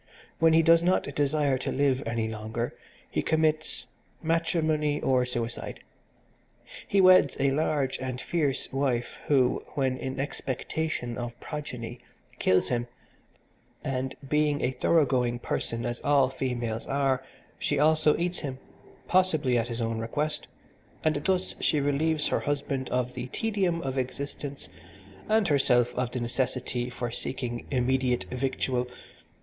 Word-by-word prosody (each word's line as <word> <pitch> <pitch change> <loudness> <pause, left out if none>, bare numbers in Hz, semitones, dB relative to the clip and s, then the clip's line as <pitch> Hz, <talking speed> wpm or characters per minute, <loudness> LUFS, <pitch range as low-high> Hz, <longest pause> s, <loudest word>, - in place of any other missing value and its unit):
When 165 0 +5
he 165 0 +6
does 165 +1 +6
not 180 +2 +3
desire 145 -2 +1
to - - -2
live 135 -1 +2
any 115 -1 0
longer 110 +2 -4 0.3
he - - -1
commits 155 -5 +1 0.4
matrimony 160 -2 +1
or 125 -1 +2
suicide. 120 -1 -4 1.1
He 200 - +2
weds 185 -1 +6
a 140 0 +3
large 140 -2 0
and 130 -1 -4
fierce 145 -7 -1
wife, 130 -3 -1
who, 130 -4 +3
when 130 -2 +1
in 130 0 -4
expectation 135 -2 -3
of 120 -1 -5
progeny, 125 -6 -6 0.4
kills 95 - +3
him, 120 -1 0 1.0
and, 130 0 -2
being 150 0 +2
a 130 - +1
thorough 160 +3 +3
going 125 -2 +1
person 115 -1 -3
as 120 0 -3
all 140 -3 +4
females 120 -4 -3
are, 135 -2 +1 0.4
she - - 0
also 155 0 +4
eats 175 +1 -1
him, 135 -4 -4 0.5
possibly 160 -9 +3
at 115 -1 +1
his 115 0 -4
own 115 0 -1
request, 150 +7 -2 0.6
and 155 -2 +2
thus 185 -1 +1
she 155 - +2
relieves 150 +2 +1
her - - +1
husband 140 -2 -2
of 125 0 0
the 125 - -5
tedium 190 - 0
of 135 0 -1
existence 140 +2 -5 0.6
and 215 -2 +4
herself 125 -4 +3
of 125 -1 -1
the 125 - -3
necessity 125 0 -2
for 120 -1 -4
seeking 120 -1 -4
immediate 130 -1 +1
victual. 125 -1 -1
135 Hz, 140 wpm, -28 LUFS, 125-150 Hz, 1.1 s, he